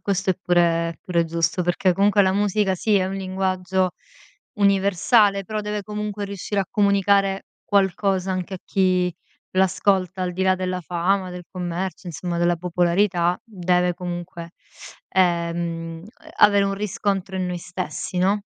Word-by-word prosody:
Questo 195 Hz, -1 st, 0 dB
è 185 Hz, -, +2 dB
pure 170 Hz, -3 st, +1 dB
pure 170 Hz, -2 st, +1 dB
giusto, 165 Hz, +2 st, 0 dB
perché, 180 Hz, +1 st, +2 dB
comunque, 200 Hz, +2 st, +3 dB
la 190 Hz, 0 st, +2 dB
musica, 205 Hz, -1 st, +1 dB
sì, 210 Hz, +3 st, 0 dB
è 185 Hz, -1 st, +2 dB
un 190 Hz, -, -4 dB
linguaggio 185 Hz, -1 st, -1 dB, 0.6 s
universale, 200 Hz, +1 st, +3 dB
però 215 Hz, +2 st, -3 dB
deve 210 Hz, 0 st, -3 dB
comunque 210 Hz, 0 st, -4 dB
riuscire 200 Hz, +1 st, -3 dB
a 190 Hz, -, -2 dB
comunicare 200 Hz, -1 st, +2 dB, 0.2 s
qualcosa 195 Hz, -1 st, +1 dB
anche 185 Hz, +1 st, -4 dB
a 185 Hz, -, -6 dB
chi 185 Hz, -2 st, +1 dB, 0.4 s
l'ascolta, 185 Hz, 0 st, +1 dB
al 180 Hz, 0 st, -2 dB
di 185 Hz, -, -2 dB
là 190 Hz, 0 st, +4 dB
della 185 Hz, 0 st, -3 dB
fama, 180 Hz, +2 st, 0 dB
del 180 Hz, -1 st, -8 dB
commercio, 180 Hz, +1 st, -4 dB
insomma, 170 Hz, +1 st, -4 dB
della 175 Hz, 0 st, +2 dB
popolarità, 175 Hz, +1 st, +1 dB
deve 180 Hz, -4 st, 0 dB
comunque, 175 Hz, -1 st, -6 dB, 0.6 s
ehm, 170 Hz, -2 st, -1 dB, 0.3 s
avere 205 Hz, -1 st, +6 dB
un 195 Hz, 0 st, -1 dB
riscontro 195 Hz, -1 st, -2 dB
in 185 Hz, -1 st, -1 dB
noi 180 Hz, -1 st, -3 dB
stessi, 180 Hz, -1 st, -5 dB
no? 195 Hz, +3 st, +2 dB
185 Hz, 145 wpm, -23 LUFS, 175-195 Hz, 0.6 s, avere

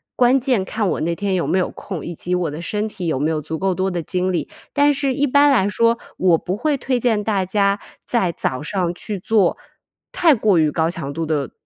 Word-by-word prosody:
关 255 Hz, +2 st, +4 dB
键 250 Hz, -6 st, +1 dB
看 210 Hz, +1 st, -2 dB
我 -, -, -2 dB
那 170 Hz, +2 st, 0 dB
天 195 Hz, +2 st, -2 dB
有 175 Hz, -, 0 dB
没 185 Hz, -, +1 dB
有 180 Hz, -, 0 dB
空， 185 Hz, -6 st, -7 dB
以 170 Hz, -, -5 dB
及 180 Hz, +3 st, -3 dB
我 175 Hz, -3 st, -1 dB
的 155 Hz, +3 st, -6 dB
身 210 Hz, +4 st, -2 dB
体 185 Hz, -4 st, -5 dB
有 155 Hz, -5 st, 0 dB
没 150 Hz, +3 st, +1 dB
有 155 Hz, -1 st, -1 dB
足 160 Hz, +2 st, -5 dB
够 190 Hz, -1 st, 0 dB
多 190 Hz, +1 st, 0 dB
的 175 Hz, -1 st, -2 dB
精 185 Hz, +2 st, -1 dB
力。 175 Hz, -, -2 dB, 0.2 s
但 290 Hz, 0 st, +3 dB
是 275 Hz, -1 st, 0 dB
一 280 Hz, +3 st, +1 dB
般 285 Hz, +2 st, +5 dB
来 220 Hz, -8 st, +3 dB
说， 230 Hz, +3 st, +2 dB, 0.2 s
我 180 Hz, -3 st, +4 dB
不 185 Hz, +4 st, -3 dB
会 290 Hz, +5 st, 0 dB
推 260 Hz, 0 st, -1 dB
荐 230 Hz, -3 st, +1 dB
大 200 Hz, -3 st, 0 dB
家 200 Hz, +1 st, +1 dB, 0.3 s
在 190 Hz, -8 st, +1 dB
早 130 Hz, -3 st, -3 dB
上 175 Hz, 0 st, -1 dB
去 200 Hz, +2 st, -6 dB
做 205 Hz, 0 st, +2 dB, 0.6 s
太 325 Hz, -4 st, +5 dB
过 210 Hz, -6 st, +2 dB
于 155 Hz, -2 st, +3 dB
高 160 Hz, 0 st, +1 dB
强 160 Hz, -5 st, -5 dB
度 165 Hz, +2 st, -3 dB
的 150 Hz, -5 st, -1 dB
190 Hz, 255 characters per minute, -20 LUFS, 170-230 Hz, 0.6 s, 般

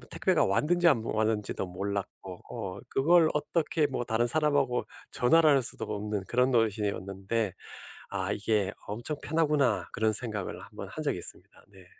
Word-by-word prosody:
택배가 -, -, +2 dB
왔는지 150 Hz, -, +2 dB
안 120 Hz, -9 st, +3 dB
왔는지도 110 Hz, -3 st, -1 dB
몰랐고 95 Hz, 0 st, -5 dB
어 95 Hz, +1 st, -5 dB
그걸 165 Hz, +4 st, +4 dB
어떻게 150 Hz, +1 st, 0 dB
뭐 130 Hz, -3 st, -3 dB
다른 115 Hz, 0 st, +1 dB
사람하고 140 Hz, -3 st, +1 dB, 0.3 s
전화를 155 Hz, +5 st, +4 dB
할 140 Hz, -2 st, +4 dB
수도 115 Hz, -, -1 dB
없는 105 Hz, -1 st, -3 dB
그런 125 Hz, +5 st, +2 dB
노릇이었는데 105 Hz, -2 st, 0 dB, 0.6 s
아 -, -, -1 dB
이게 105 Hz, -2 st, 0 dB, 0.2 s
엄청 120 Hz, +8 st, -3 dB
편하구나 145 Hz, -, +1 dB
그런 110 Hz, 0 st, +1 dB
생각을 105 Hz, -3 st, -1 dB
한번 -, -, -9 dB
한 -, -, -6 dB
적이 -, -, 0 dB
있습니다. -, -, -7 dB
네. 95 Hz, -2 st, -16 dB
115 Hz, 335 characters per minute, -29 LUFS, 100-145 Hz, 0.6 s, 그걸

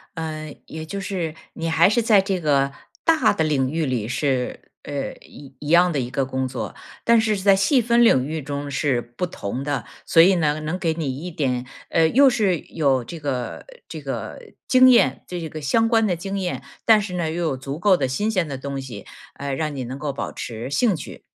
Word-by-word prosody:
呃， 155 Hz, -2 st, -5 dB
也 160 Hz, 0 st, -7 dB
就 200 Hz, +5 st, -5 dB
是 180 Hz, -5 st, -3 dB, 0.2 s
你 165 Hz, 0 st, -3 dB
还 165 Hz, +2 st, +5 dB
是 235 Hz, +2 st, +2 dB
在 215 Hz, -3 st, +5 dB
这 190 Hz, -2 st, -1 dB
个 140 Hz, -2 st, +2 dB, 0.3 s
大 320 Hz, -9 st, +4 dB
的 180 Hz, -6 st, 0 dB
领 135 Hz, -4 st, +1 dB
域 160 Hz, +1 st, -1 dB
里 120 Hz, -5 st, -1 dB
是， 130 Hz, 0 st, -2 dB
呃， 140 Hz, -1 st, -4 dB
一 135 Hz, -2 st, -14 dB
一 145 Hz, -, -8 dB
样 175 Hz, +2 st, +5 dB
的 140 Hz, -, 0 dB
一 120 Hz, -1 st, -3 dB
个 135 Hz, +1 st, -1 dB
工 130 Hz, 0 st, -2 dB
作， 130 Hz, -1 st, -5 dB, 0.3 s
但 235 Hz, -1 st, +5 dB
是 215 Hz, -1 st, +1 dB
是 190 Hz, -, -5 dB
在 200 Hz, -1 st, +6 dB
细 225 Hz, +8 st, +3 dB
分 235 Hz, +1 st, +3 dB
领 130 Hz, -, +4 dB
域 155 Hz, 0 st, -3 dB
中 140 Hz, +1 st, -5 dB
是 135 Hz, -2 st, +1 dB
不 120 Hz, +9 st, -5 dB
同 125 Hz, 0 st, -5 dB
的， 140 Hz, -5 st, -2 dB, 0.2 s
所 165 Hz, -, +4 dB
以 185 Hz, +4 st, +8 dB
呢， 155 Hz, -2 st, +1 dB
能 160 Hz, +4 st, -3 dB
给 165 Hz, -2 st, 0 dB
你 135 Hz, -5 st, -3 dB
一 180 Hz, -, -4 dB
点 130 Hz, -6 st, -1 dB, 0.2 s
呃， 160 Hz, -1 st, +4 dB
又 275 Hz, -, +5 dB
是 210 Hz, -8 st, +2 dB
有 135 Hz, -6 st, 0 dB
这 165 Hz, +7 st, -8 dB
个 130 Hz, -4 st, -4 dB, 0.2 s
这 -, -, -7 dB
个 -, -, -5 dB, 0.3 s
经 255 Hz, 0 st, +7 dB
验。 230 Hz, -, +4 dB
这 175 Hz, -2 st, -5 dB
个 155 Hz, 0 st, -7 dB
相 225 Hz, +11 st, +2 dB
关 225 Hz, -2 st, +3 dB
的 180 Hz, -, +1 dB
经 195 Hz, +3 st, -4 dB
验， 180 Hz, -2 st, -3 dB, 0.2 s
但 220 Hz, -2 st, +6 dB
是 200 Hz, -3 st, -5 dB
呢， 170 Hz, -3 st, -1 dB
又 170 Hz, +2 st, -2 dB
有 155 Hz, -5 st, 0 dB
足 135 Hz, +3 st, -6 dB
够 190 Hz, +1 st, +4 dB
的 130 Hz, -, 0 dB
新 205 Hz, +13 st, -1 dB
鲜 185 Hz, -6 st, 0 dB
的 140 Hz, -3 st, -5 dB
东 140 Hz, 0 st, -5 dB
西， 120 Hz, -7 st, -9 dB, 0.3 s
呃， 140 Hz, -1 st, -4 dB
让 150 Hz, +1 st, -2 dB
你 130 Hz, -, -3 dB
能 130 Hz, +3 st, -6 dB
够 150 Hz, -2 st, -2 dB
保 -, -, -4 dB
持 115 Hz, +3 st, -6 dB
兴 205 Hz, -, +2 dB
趣。 150 Hz, -, -9 dB
155 Hz, 240 characters per minute, -22 LUFS, 135-190 Hz, 0.3 s, 以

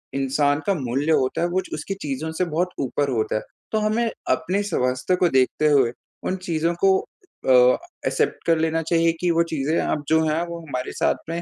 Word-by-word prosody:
इंसान 140 Hz, +2 st, +1 dB
का 200 Hz, -, +4 dB
मूल्य 140 Hz, +1 st, -1 dB
होता 130 Hz, -1 st, +1 dB
है 175 Hz, -, +2 dB
वो 185 Hz, +2 st, 0 dB
च -, -, -13 dB
उसकी 155 Hz, +6 st, -4 dB
चीज़ों 150 Hz, +2 st, -3 dB
से 180 Hz, +3 st, -1 dB
बहुत 175 Hz, +3 st, -1 dB
ऊपर 140 Hz, +2 st, -1 dB
होता 110 Hz, -4 st, -1 dB
है। 110 Hz, -, 0 dB, 0.3 s
तो 220 Hz, -, +1 dB
हमें 220 Hz, +2 st, +1 dB, 0.2 s
अपने 195 Hz, +3 st, +1 dB
स्वास्थ्य 130 Hz, -3 st, 0 dB
को 180 Hz, -1 st, +2 dB
देखते 130 Hz, +3 st, +2 dB
हुए 135 Hz, -5 st, +4 dB, 0.4 s
उन 185 Hz, -, 0 dB
चीज़ों 165 Hz, +1 st, 0 dB
को 190 Hz, -1 st, +6 dB
अ, 375 Hz, -, -6 dB, 0.6 s
एक्सेप्ट -, -, 0 dB
कर 165 Hz, -1 st, +4 dB
लेना 160 Hz, 0 st, 0 dB
चाहिए 165 Hz, +1 st, +2 dB
कि 175 Hz, -1 st, +2 dB
वो 170 Hz, 0 st, +3 dB
चीज़ें 155 Hz, +2 st, 0 dB
अब 150 Hz, -, -1 dB
जो 160 Hz, 0 st, +4 dB
हैं 155 Hz, +2 st, +1 dB
वो 170 Hz, 0 st, -6 dB
हमारे 125 Hz, -2 st, -4 dB
साथ -, -, +3 dB
में 170 Hz, +1 st, -2 dB
160 Hz, 205 wpm, -23 LUFS, 140-175 Hz, 0.6 s, को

